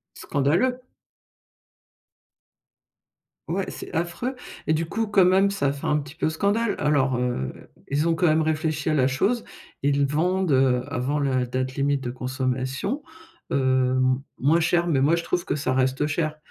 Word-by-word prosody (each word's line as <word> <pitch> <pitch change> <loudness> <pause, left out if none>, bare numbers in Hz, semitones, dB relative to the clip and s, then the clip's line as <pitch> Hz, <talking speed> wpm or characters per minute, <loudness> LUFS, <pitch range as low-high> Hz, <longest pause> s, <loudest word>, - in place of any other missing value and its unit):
Scandaleux! 175 - +1 2.7
Ouais, - - -2
c'est - - -8
affreux 175 +10 -2 0.3
et - - +4
du 165 +1 -1
coup, 220 +4 -2
quand 195 -3 +5
même, 190 +2 +4
ça 200 -8 -1
a - - +1
fait 140 - -6
un 150 - +2
petit 145 +1 -8
peu 160 - 0
scandale. 205 +6 0
Alors 140 -4 +2
heu, 120 - -1 0.4
ils 145 +3 0
ont 165 - +3
quand 175 0 +2
même 155 +1 +3
réfléchi 155 -1 -1
à - - +2
la 130 -2 +3
chose. 215 - 0 0.4
Ils 140 0 +2
vendent, 175 +3 +1
heu, 130 -1 +3
avant 140 +2 -1
la 130 -3 +1
date 130 +1 -3
limite 140 0 +1
de 120 - -3
consommation, 130 - -2 0.5
hem, 130 -1 +2 0.2
moins 155 +6 +3
cher 170 +1 +2
mais 145 -6 +2
moi 155 +5 +4
je 170 - -3
trouve 175 -1 -1
que - - -1
ça 130 -2 -1
reste 130 +3 +1
cher. 155 0 -1
145 Hz, 165 wpm, -24 LUFS, 130-170 Hz, 2.7 s, quand